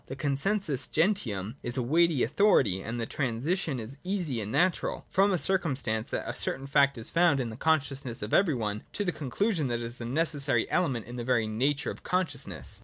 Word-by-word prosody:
The 135 - -6
consensus 145 +2 -1
gentium 130 - 0
is 120 +1 -1
a 125 - +1
weighty 160 +2 +3
authority, 115 - +3
and 115 +3 -4
the 115 - -1
transition 140 +5 -1
is 120 +5 -6
easy 180 - -2
and 105 +1 -5
natural, 180 +6 +1
from 195 +1 +3
the 190 - +2
circumstance 135 - 0
that - - -3
a - - -2
certain 135 +1 -3
fact 140 -1 +3
is 115 - -5
found 170 -5 +4
in 120 -3 -2
the - - -7
consciousness 135 -5 -1
of 105 - -5
every 175 -7 +4
one, 105 -3 -2
to 205 - -2
the 180 - +1
conclusion 160 - -1
that 120 - -1
it - - -5
is 120 +1 -7
a - - -4
necessary 140 -2 +2
element 135 -11 0
in 120 +1 -8
the 120 - -3
very 120 -2 +2
nature 135 +7 0
of - - -10
consciousness. 185 -1 -3
135 Hz, 205 wpm, -28 LUFS, 120-170 Hz, -, found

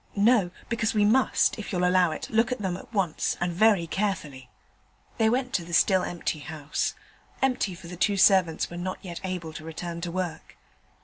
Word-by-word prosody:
No? 210 -2 +4 0.2
because 225 -2 -1
we 210 -1 +4
must, 260 +2 +3
if 210 - -6
you'll 180 -1 +1
allow 180 -1 +4
it, 155 - -5
look 225 +3 +2
at 250 - -1
them 190 -4 -2
at 185 - -11
once, 190 -7 0
and 175 0 -1
very 200 -1 +4
carefully.' 165 -8 -3 0.7
They 220 -1 +4
went 250 +2 -1
to 175 - 0
the 170 +1 -9
still 190 +2 +4
empty 170 -3 -3
house 150 0 -3 0.4
empty, 250 -8 0
for 170 - -13
the 175 +1 -7
two 200 +3 +2
servants 190 -5 +4
were 175 - -6
not 185 +1 -3
yet 175 -3 -7
able 180 -4 -4
to 155 - -8
return 170 +1 -6
to 170 0 -3
work. 175 -3 -5
185 Hz, 195 wpm, -26 LUFS, 170-210 Hz, 0.7 s, No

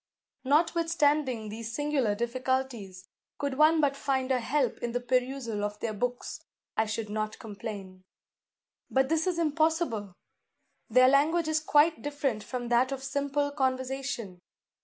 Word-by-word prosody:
"Notwithstanding 300 -5 +2
these 225 +2 -6
singular 290 -8 +1
difficulties, 235 -5 -2 0.3
could 280 -1 -3
one 315 +1 +6
but 285 -2 +2
find 265 -1 -1
a 255 - +3
help 255 0 0
in 240 -1 -3
the 245 - +1
perusal 245 -3 -1
of 210 0 -3
their 225 -2 -2
books, 245 +3 -3 0.3
I 220 - +1
should 215 0 -3
not 215 +1 -3
complain. 200 -4 -8 0.9
But 265 0 +2
this 320 +2 +1
is 360 -2 0
impossible! 310 - 0 0.8
Their 255 0 +6
language 310 +5 +3
is 315 0 +2
quite 310 +1 +3
different 285 -6 -2
from 245 -2 -5
that 245 +2 +3
of 270 -1 -4
simple 285 +1 -1
conversation. 260 -7 -2
260 Hz, 140 wpm, -29 LUFS, 225-290 Hz, 0.9 s, one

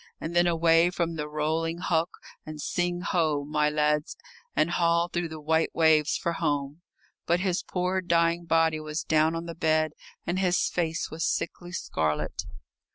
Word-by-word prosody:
And 165 +2 -5
then 175 0 +4
away 165 0 +4
from 170 -2 -2
the 150 -2 -4
rolling 160 +2 -1
hulk, 170 -1 0 0.3
and 155 -1 -8
sing 175 +3 -1
ho, 160 -7 0
my 150 0 +1
lads, 150 0 0 0.4
and 155 +3 +2
haul 170 0 +2
through 175 0 -2
the 160 0 -7
white 160 +2 +1
waves 160 -2 +4
for 170 - -2
home. 145 -1 -2 0.5
But 175 +1 +2
his 185 -1 0
poor 185 +1 -1
dying 170 -1 +1
body 165 -1 +2
was 155 0 -4
down 160 +1 +2
on 165 0 -4
the 170 - -6
bed 155 -1 +1 0.3
and 175 +2 -1
his 180 -1 +2
face 165 -1 -2
was 160 +1 -4
sickly 175 +1 -2
scarlet. 80 - -2
165 Hz, 165 wpm, -27 LUFS, 155-175 Hz, 0.5 s, then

